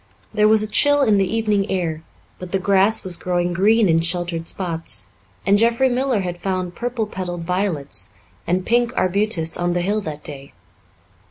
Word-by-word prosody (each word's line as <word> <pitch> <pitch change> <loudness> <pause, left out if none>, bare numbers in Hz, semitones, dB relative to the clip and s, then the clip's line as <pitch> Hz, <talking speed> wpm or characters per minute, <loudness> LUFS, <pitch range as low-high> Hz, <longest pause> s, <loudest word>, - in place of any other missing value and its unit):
There 210 0 +4
was 215 0 +4
a - - -2
chill 290 +6 +4
in 215 -5 +3
the 195 - 0
evening 215 -3 0
air, 170 -4 -2 0.4
but 180 -1 -8
the 195 - +2
grass 195 +3 +3
was 185 -3 -3
growing 175 0 -1
green 210 +4 +4
in 165 -1 +3
sheltered 170 0 -2
spots, 165 - -3 0.4
and 200 +1 +4
Jeffrey 235 +3 +3
Miller 250 -3 +1
had 175 -1 -4
found 185 -2 -2
purple 240 +1 -2
petalled 180 -4 -5
violets 180 -5 -2 0.4
and 180 +1 0
pink 240 0 +2
arbutus 185 -3 +1
on 175 0 0
the 175 - 0
hill 205 +4 0
that 150 -5 -7
day. 140 -2 -8
190 Hz, 175 wpm, -21 LUFS, 175-215 Hz, 0.4 s, There